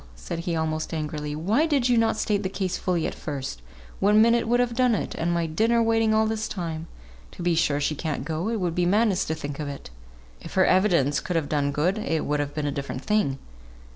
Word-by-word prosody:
said - - -6
he, 170 0 -2
almost 160 0 -2
angrily, 150 -1 -3
"why 210 - +1
did 280 -6 +2
you 245 - +3
not 225 -1 +2
state 210 -2 0
the 190 - -2
case 190 -2 -2
fully 175 -3 -1
at - - -2
first? 135 - -5 0.4
one 210 +2 +4
minute 230 +1 +4
would 240 +1 +3
have 245 -1 +1
done 250 -1 +3
it, - - -3
and 165 +1 -1
my 170 -1 +1
dinner 220 +9 +2
waiting 225 -1 +2
all 220 0 +3
this 220 0 -2
time. 165 -3 -5 0.5
To - - -7
be 175 0 +2
sure 155 -3 +2
she 145 +1 0
can't 150 -2 -3
go, 160 +6 -2
it 230 -1 -1
would 175 -3 -1
be 175 0 +1
madness 205 0 +2
to 160 - -2
think 145 -2 -6
of 150 - -3
it; 140 - -8 0.5
if 165 - -10
her 185 -1 +5
evidence 175 -8 +3
could 180 - -4
have 160 -4 0
done 145 -2 +1
good, 175 +9 0
it 165 -7 -1
would 150 0 0
have 145 0 -3
been 150 -1 -2
a 145 - 0
different 140 -1 -5
thing. 210 -11 +1
175 Hz, 235 wpm, -25 LUFS, 150-215 Hz, 0.5 s, her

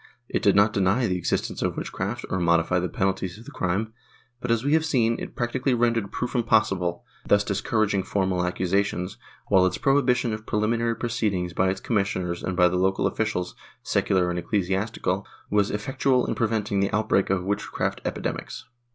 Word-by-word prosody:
It - - -1
did 100 - +4
not 105 +1 +4
deny 100 +6 +2
the 95 -4 0
existence - - -2
of - - -1
witchcraft, 105 +6 -4
or 95 - 0
modify 85 +1 +2
the 90 0 -2
penalties 95 +1 -1
of 115 - -13
the - - -10
crime 100 +5 -1 0.5
but, 125 - -5
as 115 -1 +2
we 145 +2 +1
have 160 0 +4
seen, 120 -7 +2
it - - -7
practically 130 +1 0
rendered 115 -4 +1
proof 125 - -3
impossi 110 -5 +2
ble, 85 -1 -3 0.2
thus 100 0 +4
discouraging 105 0 0
formal 95 -1 0
accusations, 90 +1 -1 0.3
while 95 -2 +5
its 95 - +1
prohibition 125 -4 +2
of 110 0 -7
preliminary 115 +2 +1
proceedings 105 -8 -1
by 95 +2 +2
its 95 +1 -2
commissioners 95 -5 -1
and 95 -1 -3
by 90 -1 +6
the 90 +1 0
local 95 +1 +1
officials, 105 -5 -1 0.3
secular 90 -2 +1
and 90 - -2
ecclesiastical, 95 +1 -1 0.3
was 105 -1 +3
effectual 125 +4 +1
in - - -1
preventing 110 -3 0
the 100 0 +1
outbreak 105 -2 +1
of 95 -2 +1
witchcraft 100 +2 -2
epidemics. - - -4
100 Hz, 175 wpm, -25 LUFS, 95-115 Hz, 0.5 s, by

